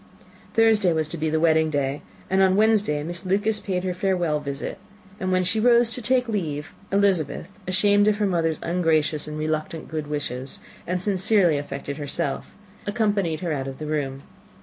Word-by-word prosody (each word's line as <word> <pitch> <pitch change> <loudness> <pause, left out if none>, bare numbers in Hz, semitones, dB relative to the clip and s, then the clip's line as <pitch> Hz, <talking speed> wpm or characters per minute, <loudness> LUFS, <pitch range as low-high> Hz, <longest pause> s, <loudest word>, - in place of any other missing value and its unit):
Thursday 220 -5 +4
was 160 -1 0
to 165 - -6
be 160 -1 -1
the 160 +1 +1
wedding 160 -1 +3
day, 140 -1 -1 0.3
and 190 +1 +2
on 190 -1 +4
Wednesday 205 -8 +3
Miss 175 +3 -1
Lucas 205 +3 +1
paid 185 -3 -2
her 185 -1 -1
farewell 175 -4 0
visit; 140 +5 -5 0.4
and 185 0 -1
when 185 0 +2
she 180 +5 +1
rose 235 0 +4
to 250 - -4
take 250 +2 +2
leave, 160 -9 -3 0.2
Elizabeth, 185 -5 +1 0.2
ashamed 205 +2 +3
of 210 -1 +3
her 210 - +1
mother's 165 -4 +1
ungracious 160 -3 +1
and 150 0 -5
reluctant 155 +1 -3
good 155 -2 -4
wishes, 135 -3 -3 0.3
and 180 +1 0
sincerely 190 -4 +3
affected 140 0 -6
herself, 145 -1 -3 0.3
accompanied 205 -7 0
her 175 -3 -2
out 135 -2 -3
of 135 0 -6
the 155 - -6
room. 140 -3 -3
170 Hz, 175 wpm, -24 LUFS, 150-200 Hz, 0.4 s, Thursday